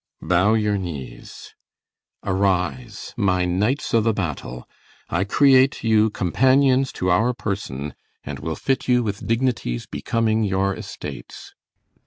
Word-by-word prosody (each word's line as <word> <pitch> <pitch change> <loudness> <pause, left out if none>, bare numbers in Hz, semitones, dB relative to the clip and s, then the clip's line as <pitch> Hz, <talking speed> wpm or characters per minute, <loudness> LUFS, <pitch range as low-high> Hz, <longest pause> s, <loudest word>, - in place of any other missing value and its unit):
CYMBELINE. - - -10
Bow 95 +4 +4
your 105 -2 +1
knees. 70 -10 -8 0.7
Arise 90 -9 -1
my 90 -2 +1
knights 105 +11 0
o' 115 - +5
th' 110 0 +1
battle; 70 -9 -4 0.4
I 85 +3 +1
create 135 +4 +4
you 110 -1 +4
Companions 130 +7 +2
to 90 0 -1
our 115 +7 +2
person, 75 - -4 0.3
and - - -6
will 80 0 -4
fit 135 - -1
you 125 -1 +3
With 100 -2 -4
dignities 115 - -1
becoming 110 -1 0
your 100 -1 0
estates. - - -9
100 Hz, 130 wpm, -22 LUFS, 90-115 Hz, 0.7 s, o